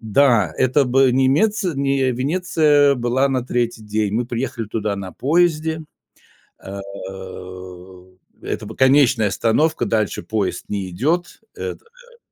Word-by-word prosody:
Да, 110 Hz, -, +3 dB
это 130 Hz, +2 st, +3 dB
бы 130 Hz, 0 st, +3 dB
немеци 165 Hz, -, +2 dB
не 135 Hz, -1 st, +1 dB
Венеция 145 Hz, 0 st, +2 dB
была 125 Hz, +3 st, +1 dB
на 130 Hz, -2 st, -1 dB
3 120 Hz, -3 st, -2 dB
день. 105 Hz, -1 st, -1 dB
Мы 120 Hz, +2 st, 0 dB
приехали 120 Hz, -2 st, -3 dB
туда 105 Hz, -1 st, -2 dB
на 95 Hz, -2 st, -7 dB
поезде. 160 Hz, +1 st, +1 dB, 0.8 s
Э, 100 Hz, +1 st, -7 dB, 1.6 s
это -, -, -4 dB
б -, -, -9 dB
конечная 130 Hz, -5 st, +4 dB
остановка, 150 Hz, +11 st, +1 dB
дальше 110 Hz, -2 st, -1 dB
поезд 105 Hz, -4 st, -2 dB
не 100 Hz, -3 st, -3 dB
идёт. 160 Hz, -, -1 dB, 0.2 s
Это -, -, -6 dB
да. 485 Hz, 0 st, -21 dB
130 Hz, 125 wpm, -20 LUFS, 110-150 Hz, 1.6 s, конечная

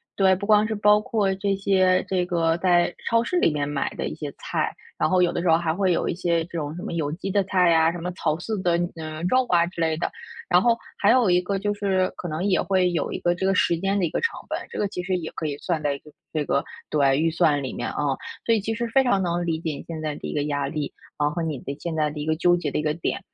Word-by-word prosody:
对， 190 Hz, -1 st, +4 dB
不 200 Hz, +2 st, -5 dB
光 210 Hz, 0 st, +4 dB
是 220 Hz, -, -2 dB
包 210 Hz, 0 st, +4 dB
括 205 Hz, -3 st, 0 dB
这 195 Hz, +1 st, -1 dB
些 185 Hz, -1 st, +2 dB
这 185 Hz, -2 st, +1 dB
个 165 Hz, -2 st, +1 dB
在 175 Hz, -1 st, +3 dB, 0.2 s
超 230 Hz, 0 st, +3 dB
市 360 Hz, -, -1 dB
里 165 Hz, -, +3 dB
面 145 Hz, -1 st, -1 dB
买 145 Hz, -1 st, -1 dB
的 -, -, -3 dB
一 -, -, -5 dB
些 -, -, -6 dB
菜， -, -, -2 dB, 0.3 s
然 -, -, +2 dB
后 185 Hz, -1 st, +4 dB
有 175 Hz, -, +2 dB
的 -, -, -1 dB
时 175 Hz, -, +1 dB
候 160 Hz, -, +6 dB
还 165 Hz, -2 st, -1 dB
会 190 Hz, 0 st, +1 dB
有 170 Hz, -, 0 dB
一 -, -, 0 dB
些 170 Hz, -2 st, 0 dB
这 -, -, -21 dB
种 155 Hz, -2 st, -4 dB
什 175 Hz, -, -7 dB
么 -, -, -4 dB
有 150 Hz, -3 st, -1 dB
机 195 Hz, +3 st, -4 dB
的 200 Hz, 0 st, +2 dB
菜 180 Hz, -3 st, +3 dB
啊、 160 Hz, 0 st, +4 dB
什 175 Hz, -, -6 dB
么 175 Hz, +1 st, -4 dB
草 165 Hz, -3 st, -1 dB
饲 210 Hz, +3 st, -3 dB
的， 175 Hz, -2 st, +2 dB, 0.2 s
呃， 155 Hz, 0 st, -6 dB
肉 255 Hz, +7 st, +2 dB
啊 170 Hz, -1 st, +4 dB
之 175 Hz, -1 st, -6 dB
类 160 Hz, -1 st, +1 dB
的。 170 Hz, -, -2 dB, 0.4 s
然 180 Hz, 0 st, +4 dB
后， 235 Hz, +1 st, +3 dB, 0.2 s
还 205 Hz, -, +4 dB
有 235 Hz, -6 st, +5 dB
一 180 Hz, -, +4 dB
个 195 Hz, +2 st, -2 dB
就 205 Hz, +1 st, -1 dB
是 190 Hz, -2 st, 0 dB
可 180 Hz, -, -6 dB
能 160 Hz, +4 st, -3 dB
也 195 Hz, -, +2 dB
会 185 Hz, -2 st, +2 dB
有 170 Hz, -, -1 dB
一 -, -, -3 dB
个 175 Hz, -, +1 dB
这 175 Hz, +2 st, -6 dB
个 190 Hz, 0 st, +2 dB
时 170 Hz, -, +3 dB
间 195 Hz, +2 st, 0 dB
的 190 Hz, -, +2 dB
一 165 Hz, -, -1 dB
个 -, -, -1 dB
成 460 Hz, -, 0 dB
本， -, -, -2 dB
这 -, -, -7 dB
个 205 Hz, -, +1 dB
其 180 Hz, -, -5 dB
实 185 Hz, 0 st, -1 dB
也 160 Hz, -2 st, -5 dB
可 160 Hz, -, -3 dB
以 145 Hz, -1 st, -3 dB
算 165 Hz, -2 st, -2 dB
在 145 Hz, -1 st, 0 dB
一 -, -, -7 dB
个 150 Hz, +2 st, -17 dB, 0.2 s
这 150 Hz, -2 st, -1 dB
个 140 Hz, -, +1 dB, 0.3 s
对， 140 Hz, -2 st, +3 dB
预 160 Hz, +2 st, +2 dB
算 155 Hz, -4 st, +2 dB
里 130 Hz, -, -4 dB
面， -, -, -3 dB
嗯。 145 Hz, -2 st, 0 dB, 0.3 s
所 230 Hz, -, +3 dB
以 220 Hz, -, +2 dB
其 225 Hz, +3 st, -2 dB
实 235 Hz, +1 st, -2 dB
非 270 Hz, +3 st, +4 dB
常 200 Hz, -7 st, +2 dB
能 175 Hz, 0 st, -1 dB
理 160 Hz, -1 st, 0 dB
解 160 Hz, -2 st, -2 dB
你 -, -, -8 dB
现 165 Hz, -1 st, -5 dB
在 155 Hz, -1 st, -2 dB
的 -, -, -9 dB
一 -, -, -5 dB
个 145 Hz, -, +1 dB
压 145 Hz, -1 st, -1 dB
力， 150 Hz, 0 st, -4 dB, 0.2 s
然 145 Hz, -, +2 dB
后 150 Hz, -, -2 dB
和 170 Hz, -, -2 dB
你 160 Hz, -4 st, -2 dB
的 140 Hz, +3 st, -6 dB
现 170 Hz, -2 st, -4 dB
在 150 Hz, -1 st, +1 dB
的 150 Hz, -, -7 dB
一 150 Hz, -, -3 dB
个 160 Hz, -, +2 dB
纠 175 Hz, +2 st, +3 dB
结 170 Hz, -4 st, -2 dB
的 -, -, -3 dB
一 150 Hz, -, -1 dB
个 150 Hz, 0 st, +1 dB
点。 165 Hz, -, -2 dB
175 Hz, 325 characters per minute, -24 LUFS, 155-195 Hz, 0.4 s, 候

